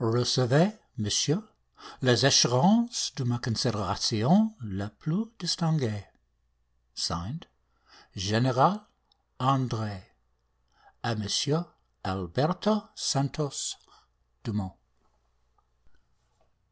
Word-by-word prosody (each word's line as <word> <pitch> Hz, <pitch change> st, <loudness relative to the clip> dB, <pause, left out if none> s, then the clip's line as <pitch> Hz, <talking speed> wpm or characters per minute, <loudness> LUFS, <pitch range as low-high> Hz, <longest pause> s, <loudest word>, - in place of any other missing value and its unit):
Recevez, 125 Hz, -, +3 dB, 0.3 s
Monsieur, 145 Hz, -, +1 dB, 0.5 s
les 125 Hz, -1 st, +4 dB
assurances 195 Hz, -, +5 dB
de 135 Hz, -, -3 dB
ma 120 Hz, -1 st, -1 dB
considération 120 Hz, -, +1 dB
la 100 Hz, -1 st, -6 dB
plus 160 Hz, -, -4 dB
distinguée. 160 Hz, -, -1 dB, 0.9 s
(Signed) 95 Hz, -, -4 dB, 0.7 s
General 130 Hz, -, +2 dB, 0.5 s
Andre. 120 Hz, -6 st, -1 dB, 1.0 s
A 120 Hz, -, -1 dB
Monsieur 140 Hz, +9 st, 0 dB, 0.4 s
Alberto 155 Hz, -, -1 dB
Santos 140 Hz, -2 st, -2 dB, 0.7 s
Dumont. 105 Hz, -4 st, -5 dB
125 Hz, 65 wpm, -27 LUFS, 105-160 Hz, 1.0 s, assurances